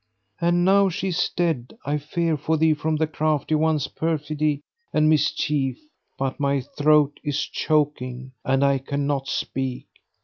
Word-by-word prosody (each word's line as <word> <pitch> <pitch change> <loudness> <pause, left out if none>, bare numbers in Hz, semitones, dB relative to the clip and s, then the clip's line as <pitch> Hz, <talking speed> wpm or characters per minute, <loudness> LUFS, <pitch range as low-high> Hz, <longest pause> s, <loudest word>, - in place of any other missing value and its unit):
And 175 +1 +2
now 195 +1 +5
she 190 +2 -2
is 180 -1 0
dead 160 -8 -2
I 145 +2 0
fear 165 +2 -1
for 155 +2 0
thee 160 0 +4
from 155 +1 -1
the 160 +1 +1
Crafty 155 -1 -1
One's 155 -2 +2
perfidy 155 -2 -1 0.3
and 155 0 +3
mischief; 145 -2 +1 0.4
but 135 -1 -2
my 140 -1 +1
throat 145 +2 +2
is 145 -2 -1
choking 130 -4 -1
and 135 +1 +2
I 140 -1 +3
cannot 140 0 -2
speak." 130 -2 -3
150 Hz, 145 wpm, -24 LUFS, 140-160 Hz, 0.4 s, now